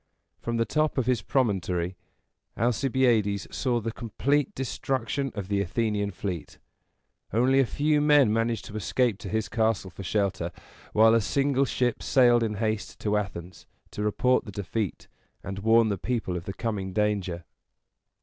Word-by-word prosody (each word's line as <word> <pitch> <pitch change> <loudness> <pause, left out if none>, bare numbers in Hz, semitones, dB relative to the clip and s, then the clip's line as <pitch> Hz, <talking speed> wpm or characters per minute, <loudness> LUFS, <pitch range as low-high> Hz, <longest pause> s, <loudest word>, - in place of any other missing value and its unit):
From 115 0 -2
the 115 - +2
top 155 +7 0
of 130 - +1
his 125 -3 +1
promontory, 95 -8 0 0.6
Alcibiades 120 -4 +2
saw 125 -3 +1
the 115 0 -3
complete 140 - -1
destruction 135 +1 -2
of 100 -3 -4
the 100 0 +1
Athenian 105 +1 -1
fleet. 90 -3 -5 0.7
Only 125 +5 +3
a 135 - +3
few 150 +3 +1
men 145 -7 +5
managed 115 0 0
to 105 - -9
escape 110 0 0
to 100 - -7
his 110 -1 -1
castle 110 -3 0
for 90 - -9
shelter; 95 -3 -1 0.4
while 110 +1 +5
a 115 - +4
single 140 +4 +1
ship 120 0 -1
sailed 120 -2 +4
in 110 -2 -1
haste 110 0 -2
to 105 -1 0
Athens, 90 -4 -5 0.2
to - - -5
report 115 +5 +2
the 105 - -7
defeat, 100 0 -4 0.4
and 100 0 -5
warn 110 +2 +4
the 100 -3 -2
people 115 -7 -2
of 85 0 -5
the 95 - -4
coming 100 -5 -3
danger. 100 -5 -1
110 Hz, 160 wpm, -27 LUFS, 100-125 Hz, 0.7 s, men